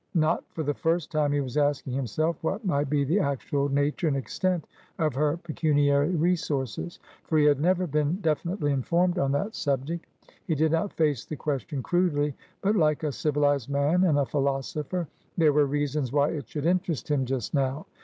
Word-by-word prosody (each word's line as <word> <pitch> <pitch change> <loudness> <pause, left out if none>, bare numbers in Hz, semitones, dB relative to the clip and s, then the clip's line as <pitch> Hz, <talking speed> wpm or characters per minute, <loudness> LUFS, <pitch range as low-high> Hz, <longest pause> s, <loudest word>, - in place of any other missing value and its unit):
Not 155 -1 +2
for 160 - -4
the 145 0 0
first 165 +1 -1
time, 150 -2 +1
he 145 0 +1
was 130 0 -4
asking 145 -3 +1
himself 150 +6 -1
what 200 +7 -2
might 145 -6 +1
be 145 -1 +2
the 160 +9 +2
actual 140 -2 -1
nature 145 +4 0
and 140 -3 +1
extent 180 +5 -1 0.3
of 155 -4 +1
her 150 +4 +1
pecuniary 145 -3 +2
resources, 160 - -1 0.3
for 160 - 0
he 150 - +5
had 145 -1 +4
never 185 +2 +2
been 150 0 0
definitely 160 -1 0
informed 175 +7 +1
on 135 -3 +1
that 200 +10 -1
subject. 145 +4 -2 0.4
He 160 - +1
did 155 +1 +2
not 165 +5 0
face 150 -7 +1
the 155 - -6
question 140 -1 -3
crudely, 150 -5 +1 0.3
but 205 +2 +2
like 155 -5 +2
a 150 - 0
civilised 145 -3 +1
man 145 +6 +2
and 160 -6 +3
a 140 - +2
philosopher; 145 +5 -2 0.3
there 155 -3 +4
were 145 -1 +4
reasons 145 -2 -1
why 145 0 +3
it 145 -7 -5
should 150 -1 -4
interest 175 -4 0
him 140 -2 +2
just 130 -4 -3
now. 135 +1 0
150 Hz, 185 wpm, -27 LUFS, 140-165 Hz, 0.4 s, he